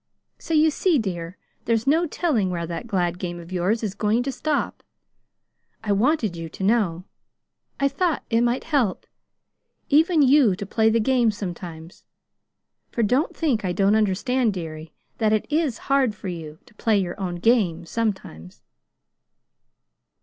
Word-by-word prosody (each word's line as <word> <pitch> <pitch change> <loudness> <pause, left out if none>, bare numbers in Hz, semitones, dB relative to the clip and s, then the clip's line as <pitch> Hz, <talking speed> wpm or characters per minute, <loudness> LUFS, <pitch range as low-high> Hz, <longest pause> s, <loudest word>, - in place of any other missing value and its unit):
So 330 - -2
you 310 +1 +5
see, 340 +1 +2
dear, 180 -5 -4 0.3
there's 225 -1 +1
no 320 +5 +3
telling 275 - 0
where 170 -2 -3
that 170 +8 -6
glad 180 -4 -1
game 175 -2 -4
of 170 +1 -12
yours 185 +6 0
is 205 -3 -2
going 215 +4 +1
to 275 - -2
stop. 295 +3 -2 1.0
I 210 - -1
wanted 220 - +1
you 165 -1 -6
to 190 - -8
know. 190 -5 +1 0.8
I 275 - +3
thought 310 +3 -1
it 230 +1 +3
might 240 +1 +1
help 270 - 0 0.8
even 315 +1 +4
you 265 -7 +5
to 200 - -6
play 220 +2 +2
the 230 +1 +2
game 245 0 +3
sometimes; 175 -5 -7 0.9
for 235 - 0
don't 255 +9 +1
think 270 -10 0
I 180 -2 -1
don't 195 +3 +3
understand, 220 +2 +1
dearie, 160 -2 -7 0.3
that 215 -1 +2
it 215 - +1
IS 300 -7 +1
hard 270 -5 +2
for 195 - -6
you 160 -3 -7
to - - -21
play 215 0 +1
your 185 -2 -2
own 180 -2 -3
game 175 -4 +2
sometimes." 190 - -4
215 Hz, 155 wpm, -23 LUFS, 180-260 Hz, 1.0 s, you